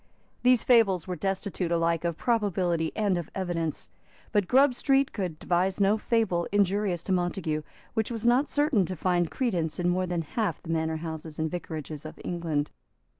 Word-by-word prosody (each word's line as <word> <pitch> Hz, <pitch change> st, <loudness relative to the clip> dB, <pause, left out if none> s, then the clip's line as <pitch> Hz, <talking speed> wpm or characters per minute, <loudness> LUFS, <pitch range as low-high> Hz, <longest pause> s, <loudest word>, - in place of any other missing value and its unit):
These 250 Hz, -1 st, +4 dB
fables 205 Hz, -9 st, +4 dB
were 180 Hz, -, -2 dB
destitute 190 Hz, 0 st, -2 dB
alike 165 Hz, -1 st, +1 dB
of 170 Hz, -2 st, -1 dB
probability 185 Hz, -8 st, 0 dB
and 200 Hz, -5 st, +1 dB
of 170 Hz, -, -7 dB
evidence. 165 Hz, -, -3 dB, 0.4 s
But 205 Hz, -4 st, +2 dB
Grub 265 Hz, +3 st, +5 dB
Street 270 Hz, +2 st, +2 dB
could 180 Hz, -7 st, -3 dB
devise 180 Hz, +3 st, 0 dB
no 200 Hz, +2 st, +3 dB
fable 215 Hz, -7 st, +1 dB
injurious 200 Hz, -3 st, +1 dB
to -, -, -4 dB
Montague 175 Hz, -4 st, 0 dB, 0.3 s
which 220 Hz, -2 st, 0 dB
was 230 Hz, -1 st, -4 dB
not 250 Hz, +5 st, +4 dB
certain 290 Hz, -8 st, +2 dB
to 185 Hz, -, -4 dB
find 175 Hz, 0 st, +1 dB
credence 180 Hz, -, -1 dB
in 175 Hz, 0 st, +2 dB
more 185 Hz, +1 st, 0 dB
than 175 Hz, -2 st, -1 dB
half 215 Hz, +7 st, -2 dB
the 165 Hz, -, -10 dB
manor 160 Hz, 0 st, 0 dB
houses 160 Hz, -1 st, -6 dB
and 160 Hz, 0 st, -1 dB
vicarages 155 Hz, -4 st, -5 dB
of 155 Hz, -, -9 dB
England. 160 Hz, -4 st, -2 dB
180 Hz, 175 wpm, -27 LUFS, 165-210 Hz, 0.4 s, Grub